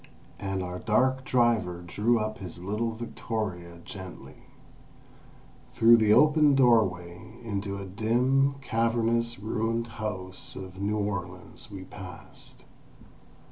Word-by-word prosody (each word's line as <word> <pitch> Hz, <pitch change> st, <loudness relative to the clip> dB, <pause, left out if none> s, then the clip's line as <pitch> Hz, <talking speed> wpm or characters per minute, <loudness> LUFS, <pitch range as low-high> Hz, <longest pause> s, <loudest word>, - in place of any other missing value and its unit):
And 95 Hz, -1 st, -2 dB
our 90 Hz, 0 st, -5 dB
dark 130 Hz, +6 st, +2 dB
driver 115 Hz, -9 st, +2 dB
drew 110 Hz, +7 st, +2 dB
up 110 Hz, 0 st, -3 dB
his 90 Hz, -3 st, -7 dB
little 110 Hz, +4 st, -2 dB
victoria 105 Hz, -6 st, -4 dB
gently. 95 Hz, 0 st, -10 dB, 1.3 s
Through 115 Hz, +1 st, +7 dB
the 110 Hz, -2 st, +3 dB
open 150 Hz, +2 st, +6 dB
doorway, 100 Hz, -7 st, +2 dB
into 100 Hz, -3 st, -3 dB
a 100 Hz, -, -6 dB
dim, 125 Hz, +8 st, +2 dB
cavernous, 115 Hz, -1 st, +1 dB
ruined 115 Hz, +2 st, -1 dB, 0.2 s
house 95 Hz, -4 st, -5 dB
of 95 Hz, 0 st, -8 dB
New 105 Hz, +2 st, 0 dB
Orleans 100 Hz, +3 st, -5 dB
we 100 Hz, -2 st, -8 dB
passed. 90 Hz, -1 st, -10 dB
110 Hz, 110 wpm, -28 LUFS, 95-115 Hz, 1.3 s, Through